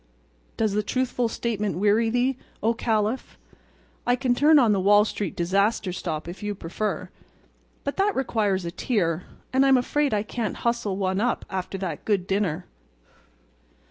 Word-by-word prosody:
Does 220 -3 +1
the 210 - +2
truthful 245 +1 -1
statement 210 -6 -2
weary 210 +4 +3
thee, 245 +3 +1 0.3
O 225 +2 +3
Caliph? 225 +1 -1 0.7
I 245 - +3
can 250 -1 +1
turn 300 +5 +5
on 240 -6 +5
the 200 - +2
Wall 205 +2 +5
Street 205 -4 -3
disaster 195 +2 +1
stop 160 -3 -4
if 175 +4 -8
you 210 0 -3
prefer, 195 +4 -3 0.7
but 280 - -3
that 400 +1 +2
requires 210 -8 0
a 170 - -3
tear, 180 -5 -1 0.3
and 265 +1 +4
I'm 270 -1 +6
afraid 285 +3 +1
I 210 -1 +1
can't 225 0 -3
hustle 235 -5 0
one 190 0 0
up 245 +1 0
after 190 0 -3
that 180 -6 -4
good 200 -4 +1
dinner." 190 -3 -1
210 Hz, 160 wpm, -25 LUFS, 190-245 Hz, 0.7 s, I'm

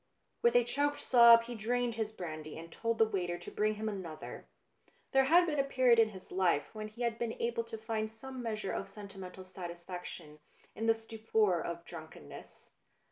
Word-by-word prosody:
With 235 0 +4
a 245 - +7
choked 285 +4 0
sob 235 -2 +8
he 240 +1 -7
drained 240 +2 0
his 220 -1 -2
brandy 155 -6 -7
arid 165 +1 -9
told 230 +4 -1
the 225 - +6
waiter 180 -5 -2
to 175 - -9
bring 215 0 +1
him 215 +1 -4
another. 180 -7 -6 0.6
There 270 -1 +5
had 345 +5 +6
been 300 -4 -1
a - - +4
period 255 -3 +4
in 225 -1 +5
his 190 -3 -12
life 180 -4 +1
when 215 -1 -5
he 225 +3 -6
had 235 -1 -1
been 235 -1 -3
able 235 0 0
to 230 -1 -7
find 220 0 -2
some 255 +4 -8
measure 215 -4 -3
of 195 - -4
senti 200 -1 -10
mental 185 0 -8
satisfaction 175 -3 -8 0.3
in 225 - -3
the 225 - +5
stupor 220 -4 0
of 170 0 -5
drunken 160 - -10
ness. - - -12
220 Hz, 195 wpm, -33 LUFS, 185-235 Hz, 0.6 s, sob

